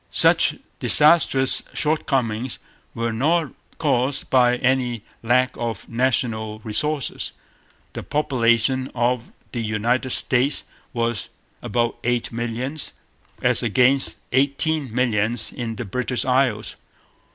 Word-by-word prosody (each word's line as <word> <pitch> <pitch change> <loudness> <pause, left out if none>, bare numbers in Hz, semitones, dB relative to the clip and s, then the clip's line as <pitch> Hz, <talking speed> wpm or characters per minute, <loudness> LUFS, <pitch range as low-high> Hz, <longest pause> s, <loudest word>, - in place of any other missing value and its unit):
Such - - +4 0.2
disastrous 150 -4 +5
shortcomings 130 -6 -1 0.4
were 115 0 -2
not 155 +5 +1 0.3
caused 135 -3 0
by 125 -1 +4
any 125 -3 0 0.2
lack 125 +2 +2
of 115 -5 -4
national 115 -3 -1
resources. 140 +7 -2 0.6
The - - -5
population 130 -2 +1
o 120 0 +1 0.3
the 120 - -3
United 115 +4 -1
States 130 +3 +2 0.3
was 115 -2 -2 0.3
about 120 +2 -1
eight 120 0 -1
millions, 120 +5 -3 0.5
as - - +4
against 130 +2 +2 0.2
eighteen 140 +1 +1
millions 115 -2 0
in 115 -2 -4
the 120 - -5
British 125 +3 -1
Isles. 125 -4 0
125 Hz, 105 wpm, -22 LUFS, 115-135 Hz, 0.6 s, disastrous